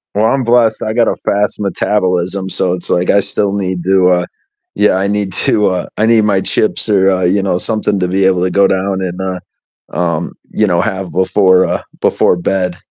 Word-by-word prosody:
Well, 105 - +1
I'm 130 +3 +1
blessed, 120 -1 +2
I 110 - -3
got 115 0 +1
a - - 0
fast 105 +1 +1
metabolism, 95 -1 -1
so 90 -1 +1
it's 90 - -2
like 90 +1 0
I 100 - +4
still 100 0 +1
need 95 -3 -3
to, 95 -1 +3
uh 90 -1 +1 0.5
Yeah, 105 -2 +2
I 95 +1 -1
need 100 -2 -2
to, 105 -1 +2
uh 90 -1 -3
I 110 - +1
need 115 -1 +3
my 100 -2 +1
chips 110 +2 +1
or, 95 -2 +3
uh, 95 -1 -1
you 95 +3 +1
know, 95 -2 -1
something 105 +1 0
to 90 - -1
be 95 +1 0
able 90 -2 +1
to 90 - -1
go 100 +1 +3
down 95 0 -2
and, 90 0 -5
uh 95 -1 -4 0.5
um, 85 -2 -2 0.2
you 105 - 0
know, 85 -2 +1
have 95 -4 -4
before, 95 0 +2
uh - - -2 0.2
before - - +1
bed. 90 0 -2
95 Hz, 215 wpm, -13 LUFS, 90-105 Hz, 0.5 s, I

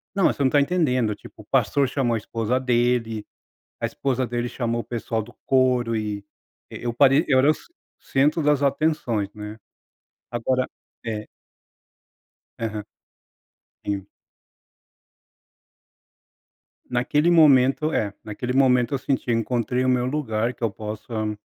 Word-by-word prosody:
Não, 195 - +3
mas - - +3
você 140 - -1
não 130 - +4
tá 145 - +5
entendendo, 130 - +1
tipo, - - -14
o - - -17
pastor 140 -2 +2
chamou 130 -4 0
a - - +1
esposa 115 +3 -1
dele, 120 -3 +1 0.5
a - - -1
esposa 130 -2 -1
dele 120 +1 -2
chamou 120 -1 -2
o - - -12
pessoal 115 -1 -3
do 120 - -14
coro 125 -3 +2
e 105 -2 -3 0.5
eu 120 -1 -4
parei 140 +5 +5
eu 130 -3 +4
era 140 +3 +5
o - - +6 0.4
centro 150 +4 +1
das 150 -1 +3
atenções, 140 -7 +1
né? 105 +1 -8 0.7
Agora, 130 +2 0 0.4
eh 110 -2 -4 1.3
Aham. 110 -2 -3 1.0
Sim. 100 -1 -3 2.8
Naquele 145 +7 +2
momento, 150 -1 +5
eh, 100 -2 0
naquele 125 +4 -4
momento 125 -1 +3
eu - - +2
senti 130 -1 -2
eu 115 - +3
encontrei 125 +2 0
o - - +2
meu 125 -1 +2
lugar 125 -4 -1
que 120 - -11
eu 115 - +2
possa 110 0 -4
125 Hz, 140 wpm, -24 LUFS, 115-135 Hz, 2.8 s, o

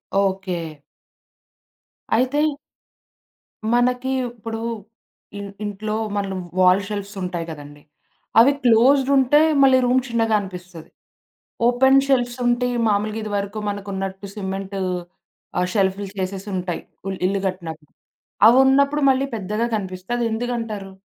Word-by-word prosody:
Okay. 190 -5 -1 1.4
అయితే 260 +5 +1 1.3
మనకి 250 +2 +1 0.2
ఇప్పుడు 225 -1 -6 0.8
ఇన్ 200 0 -6 0.2
ఇంట్లో 215 +1 -3 0.2
మన 200 -1 -2 0.3
వాల్ 185 +1 +5
షెల్ఫ్‌స్ 205 0 -5
ఉంటాయి 175 -2 -3
గదండీ. 145 -1 -11 0.6
అవి 250 +5 +7
క్లోజ్డ్ 255 +4 +5
ఉంటే 270 +3 +5 0.2
మళ్ళీ 265 -1 +6
రూమ్ 255 +1 +3
చిన్నగా 225 -2 +1
అనిపిస్తది. 180 -4 -9 0.8
ఓపెన్ 265 +3 +5
షెల్ఫ్‌స్ 245 -2 +1
ఉంటే 245 +1 +2 0.2
మామూలుగా 210 +1 0
ఇది 215 - -5
వరకు 200 +2 -3
మనకు 205 0 -5
ఉన్నట్టు 195 +1 -5
సిమెంటు 195 -1 -4 0.8
ఆహ్, 180 - +1
షెల్ఫ్‌లు 195 0 +1
చేసేసి 190 +2 -4
ఉంటాయి. 180 -1 -3 0.3
ఉల్ 190 - -4
ఇల్లు 195 +1 0
గట్టినప్పుడు. 160 -5 -8 0.6
అవున్నప్పుడు 270 +4 +4
మళ్ళీ 265 +1 +1
పెద్దగా 210 +3 -2
కనిపిస్తది. 190 +4 -4
ఎందుకంటారు? 220 -4 -4
205 Hz, 110 wpm, -22 LUFS, 190-245 Hz, 1.4 s, అవి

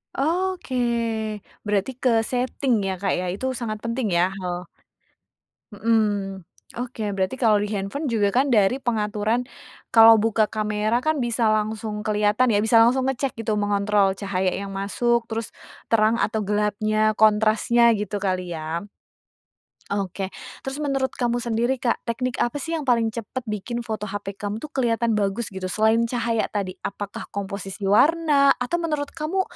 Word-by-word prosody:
Oke, 345 0 -1 0.9
berarti 205 +4 0
ke 230 -3 +3
setting 250 -1 0
ya 190 - -1
Kak 195 +1 -1
ya, 180 0 -1
itu 260 +6 -2
sangat 225 -4 -5
penting 230 0 -1
ya? 180 +2 +3
Heeh. 180 -2 -4 1.1
Mhm, 225 +3 +1 0.8
oke 245 -2 -5
berarti 190 +5 -1
kalau 220 -3 +5
di 210 - -2
handphone 200 +10 -3
juga 205 -3 +2
kan 270 +1 +3
dari 210 +4 +4
pengaturan, 215 0 0 0.5
kalau 225 -1 +8
buka 220 -1 +2
kamera 215 +2 0
kan 310 +3 0
bisa 235 -1 +1
langsung 215 0 -1
kelihatan 210 +3 +2
ya, 205 - +3
bisa 225 +2 +2
langsung 255 +2 +2
ngecek 270 0 -1
gitu 215 -1 -1
mengontrol 205 -1 +2
cahaya 190 -2 0
yang 200 +1 -5
masuk, 235 +4 +1
terus 225 -1 -3 0.4
terang 225 0 +4
atau 215 0 0
gelapnya, 215 +1 +1
kontrasnya, 220 +2 +4
gitu 205 0 -3
kali 185 -2 -1
ya? 160 +2 -4 1.1
Oke, 195 -1 -2 0.3
terus 270 +1 -5
menurut 275 -3 0
kamu 240 0 0
sendiri 235 +2 0
Kak, 245 -2 -1
teknik 250 +2 -2
apa 260 +3 -1
sih 330 0 -2
yang 295 - -6
paling 230 -2 +3
cepat 230 +3 -5
bikin 235 +3 -4
foto 215 -2 -4
HP 200 -1 -6
kamu 205 +2 -4
tuh 305 - -7
kelihatan 230 -4 +1
bagus, 205 +3 -1
gitu? 190 -1 -5
Selain 220 +4 +2
cahaya 230 -2 0
tadi, 195 -3 -4
apakah 200 0 -6
komposisi 200 0 -5
warna 290 +2 +4
atau 250 +8 -2
menurut 300 -4 -2
kamu 335 +4 -1
220 Hz, 150 wpm, -23 LUFS, 205-245 Hz, 1.1 s, kalau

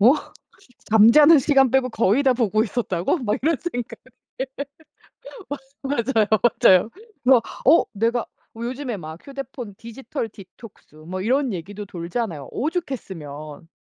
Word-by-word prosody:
'어? 235 +6 +7 0.8
잠자는 255 +9 +7
시간 270 -2 +4
빼고 265 0 +2
거의 225 +3 +2
다 265 -2 +4
보고 215 -3 +1
있었다고?' 215 - -1
막 220 -5 -1
이런 320 +2 +2 0.2
생각 245 -2 -5 0.4
예. 265 - 0 1.4
맞 275 0 -2 0.2
맞아요, 220 -2 +4 0.4
맞아요. 185 +4 +6 0.3
그래서 255 -2 +6 0.2
어 315 +6 +6
내가 230 +3 0 0.3
요즘에 245 +1 -4
막 160 -2 -10
휴대폰 270 -6 -7
디지털 230 0 -6
디톡스 200 -4 -15
뭐 170 +5 -6
이런 255 +5 +1
얘기도 200 +4 -6
돌잖아요 170 - -4
오죽했으면. 180 - -5
230 Hz, 280 characters per minute, -22 LUFS, 190-265 Hz, 1.4 s, 어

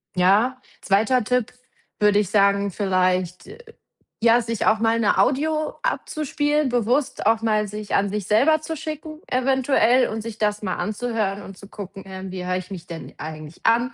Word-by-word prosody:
ja, 210 +8 +3 0.2
2. 220 +5 +2
Tipp, 250 0 0 0.5
würde 210 0 +4
ich 205 -4 -1
sagen, 200 -1 +3
vielleicht, 185 -2 0
äh, 440 - -11 0.6
ja, 235 +1 +5
sich 230 -1 -3
auch 220 0 +4
mal 230 0 +2
'ne 210 -2 +2
Audio 305 +3 +1
abzuspielen, 300 - -1
bewusst 245 +3 0
auch 225 +1 +3
mal 215 -2 +1
sich 210 0 -4
an 200 0 +2
sich 205 -1 -4
selber 290 +9 +4
zu 320 +1 -5
schicken 310 +1 -7
eventuell 260 -1 +3
und 220 0 -4
sich 225 -1 -7
das 210 0 0
mal 185 -4 -2
anzuhören 215 -2 -2
und 195 -2 -11
zu 200 - -12
gucken: 195 -2 -9
„Ähm, 190 0 -7
wie 180 -1 -5
hör 180 0 0
ich 185 -1 -7
mich 175 -2 -7
denn 165 -1 -9
eigentlich 155 0 -9
an? 235 +4 +3
215 Hz, 175 wpm, -23 LUFS, 195-255 Hz, 0.6 s, ja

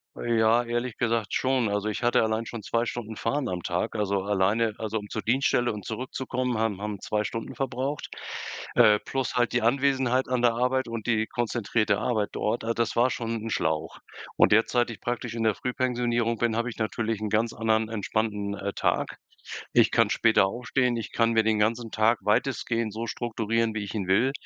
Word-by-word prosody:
Ja, 115 0 +2
ehrlich 120 0 -3
gesagt 115 -3 0
schon. 130 -4 +1
Also, 105 +1 -1
ich 105 - -4
hatte 120 - +4
allein 110 +1 0
schon 115 -1 -6
zwei 115 +3 0
Stunden 115 -2 -5
Fahren 125 +4 -1
am 90 -1 -4
Tag. 90 +4 -2
Also, 100 -2 0
alleine 105 +3 +1
also, 110 0 -2
um 105 0 -10
zur 110 - -4
Dienststelle 120 -1 +2
und 105 -3 -8
zurückzukommen 125 0 -3
haben 110 -4 0
haben 105 -2 -4
zwei 105 0 -1
Stunden 115 +1 -5
verbraucht. 135 +2 -3 0.7
Äh, 105 -1 +6
plus 135 +2 -3
halt 120 -1 +1
die 120 - +1
Anwesenheit 130 0 +2
an 125 -1 0
der 120 -1 +5
Arbeit 125 +2 +1
und 115 -1 -5
die 110 -2 +2
konzentrierte 115 -3 0
Arbeit 110 -3 0
dort. 110 +3 -1
Ah, 115 +1 0
das 115 -1 0
war 120 +2 +4
schon 115 -2 -3
'nen 115 +1 -5
Schlauch. 80 -5 -1 0.4
Und - - +5
derzeit 120 +3 +3
ich 115 - -10
praktisch 120 -1 -3
in 115 - -3
der 110 -2 +2
Frühpensionierung 120 -2 0
bin 115 -1 0
habe 115 +2 0
ich 120 - -9
natürlich 110 0 -1
'nen 105 0 -3
ganz 110 +2 +2
anderen 110 0 0
entspannten, 105 -1 -2
äh, 100 0 -3
Tag. - - -1 0.6
Ich - - +5
kann - - +3
später 110 -3 +4
aufstehen, 120 +3 0
ich 115 - -5
kann 115 0 +2
mir 110 -1 +4
den 110 -1 +1
ganzen 115 +2 0
Tag 110 +2 +3
weitestgehend 115 0 0
so 115 +2 -4
strukturieren 115 -1 -1
wie 105 - -2
ich 100 - -7
ihn 100 -4 -2
will, 115 +8 +3
115 Hz, 195 wpm, -27 LUFS, 110-120 Hz, 0.7 s, Äh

